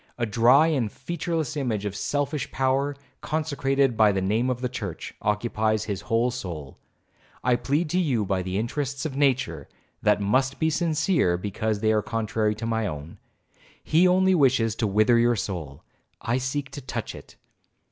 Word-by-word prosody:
A 120 Hz, -, 0 dB
dry 120 Hz, +7 st, +5 dB
and 135 Hz, -10 st, 0 dB
featureless 165 Hz, +1 st, -3 dB
image 115 Hz, -8 st, -2 dB
of 100 Hz, -1 st, -3 dB
selfish 145 Hz, +6 st, -2 dB
power, 135 Hz, +2 st, 0 dB, 0.3 s
consecrated 140 Hz, -4 st, 0 dB
by 110 Hz, -1 st, +5 dB
the 95 Hz, -, 0 dB
name 110 Hz, +7 st, +1 dB
of 125 Hz, -1 st, -2 dB
the 125 Hz, -, 0 dB
church, 105 Hz, -8 st, -6 dB
occupies 110 Hz, 0 st, 0 dB
his 100 Hz, -4 st, -4 dB
whole 115 Hz, +3 st, +1 dB
soul,—I 90 Hz, -, -5 dB
plead 145 Hz, +7 st, 0 dB
to 180 Hz, -, +2 dB
you 130 Hz, -, +1 dB
by 95 Hz, -1 st, 0 dB
the 95 Hz, +1 st, -3 dB
interests 135 Hz, +5 st, -2 dB
of 145 Hz, -4 st, -3 dB
nature, 135 Hz, -2 st, 0 dB, 0.3 s
that 105 Hz, -1 st, +3 dB
must 130 Hz, +7 st, +1 dB
be 160 Hz, 0 st, +1 dB
sincere, 155 Hz, -, +1 dB
because 105 Hz, +2 st, -2 dB
they 110 Hz, -1 st, +3 dB
are 110 Hz, -1 st, +2 dB
contrary 110 Hz, 0 st, -1 dB
to 110 Hz, +2 st, -5 dB
my 115 Hz, -2 st, 0 dB
own. 75 Hz, -1 st, -7 dB, 0.6 s
He 170 Hz, +4 st, +4 dB
only 190 Hz, +1 st, +4 dB
wishes 130 Hz, -, +3 dB
to 110 Hz, -, +1 dB
wither 110 Hz, +4 st, +4 dB
your 120 Hz, 0 st, +3 dB
soul,—I 95 Hz, -, -5 dB
seek 140 Hz, +2 st, -3 dB
to 145 Hz, -, -7 dB
touch 125 Hz, -3 st, -5 dB
it. -, -, -13 dB
120 Hz, 165 wpm, -25 LUFS, 105-140 Hz, 0.6 s, dry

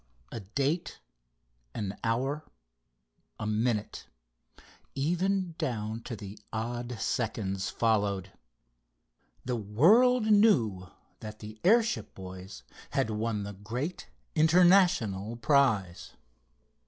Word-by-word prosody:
_" -, -, -5 dB
A -, -, -3 dB
date, 140 Hz, -, -2 dB, 0.8 s
an 100 Hz, -1 st, -3 dB
hour, 135 Hz, +7 st, -1 dB, 1.0 s
a -, -, -3 dB
minute, 110 Hz, 0 st, -1 dB, 0.9 s
even 180 Hz, +5 st, 0 dB
down 115 Hz, -7 st, -3 dB
to 105 Hz, -5 st, -7 dB, 0.2 s
odd 120 Hz, +1 st, -4 dB
seconds 100 Hz, -5 st, -2 dB
followed. 100 Hz, -4 st, 0 dB, 1.1 s
The 125 Hz, -1 st, -1 dB
world 210 Hz, -, +4 dB
knew 135 Hz, -, +3 dB, 0.3 s
that 110 Hz, -1 st, -8 dB
the 110 Hz, 0 st, -10 dB
airship 230 Hz, +4 st, +2 dB
boys 95 Hz, -5 st, -9 dB, 0.3 s
had 110 Hz, -, +1 dB
won 105 Hz, -1 st, -2 dB
the 100 Hz, 0 st, -6 dB
great 120 Hz, -, -5 dB, 0.3 s
international 160 Hz, -, +4 dB
prize! 120 Hz, -, +1 dB
115 Hz, 90 wpm, -29 LUFS, 105-155 Hz, 1.1 s, world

